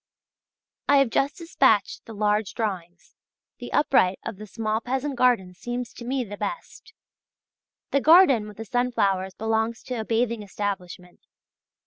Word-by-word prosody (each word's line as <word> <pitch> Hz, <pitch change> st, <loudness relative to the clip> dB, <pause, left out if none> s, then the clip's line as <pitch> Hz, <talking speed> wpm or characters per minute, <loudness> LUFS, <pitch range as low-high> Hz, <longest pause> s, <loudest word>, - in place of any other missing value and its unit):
I 285 Hz, -, +6 dB
have 275 Hz, -4 st, +3 dB
just 275 Hz, +5 st, 0 dB
dispatched 265 Hz, -, +1 dB
the 225 Hz, -, -9 dB
large 210 Hz, 0 st, 0 dB
drawings: 180 Hz, -6 st, -5 dB, 0.5 s
the -, -, -8 dB
upright 195 Hz, -10 st, +3 dB
of 200 Hz, -, -5 dB
the 215 Hz, +1 st, -9 dB
small 220 Hz, +1 st, -2 dB
peasant 265 Hz, +3 st, -2 dB
garden 240 Hz, -8 st, +2 dB
seems 240 Hz, +5 st, -5 dB
to -, -, -10 dB
me 260 Hz, +1 st, -1 dB
the 205 Hz, -2 st, -8 dB
best. 450 Hz, -, -6 dB, 1.0 s
The 280 Hz, -, +2 dB
garden 300 Hz, -, +6 dB
with 210 Hz, -, -12 dB
the 225 Hz, -, -6 dB
sunflowers 200 Hz, -6 st, 0 dB
belongs 220 Hz, +1 st, -1 dB
to 250 Hz, -3 st, -4 dB
a -, -, -2 dB
bathing 230 Hz, 0 st, 0 dB
establishment. 190 Hz, -3 st, -6 dB
225 Hz, 145 wpm, -25 LUFS, 205-250 Hz, 1.0 s, I